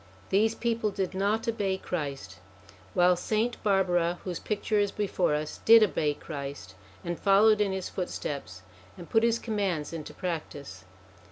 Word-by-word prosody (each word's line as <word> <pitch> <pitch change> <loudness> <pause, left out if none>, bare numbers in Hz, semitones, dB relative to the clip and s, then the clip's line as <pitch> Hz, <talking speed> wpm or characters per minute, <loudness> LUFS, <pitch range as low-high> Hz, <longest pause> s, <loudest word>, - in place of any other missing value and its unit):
These 220 +3 +3
people 230 -2 0
did 190 -2 -3
not 205 +4 0
obey 200 -4 0
Christ, 140 - -5 0.6
while 180 0 +5
Saint 220 +6 -1
Barbara, 180 -4 +2
whose 180 -3 -4
picture 210 0 -1
is 205 -1 +1
before 190 -6 0
us, 150 0 -4
did 225 0 +8
obey 150 -7 +1
Christ, 140 - -7 0.3
and 175 -1 -3
followed 210 +2 +5
in 200 -2 +1
his 190 -1 -3
footsteps 140 - -5 0.3
and 175 -2 -11
put 225 - +4
his 230 0 +3
commands 195 -10 -2
into 160 -2 -7
practice. 145 - -6
190 Hz, 150 wpm, -28 LUFS, 155-210 Hz, 0.6 s, did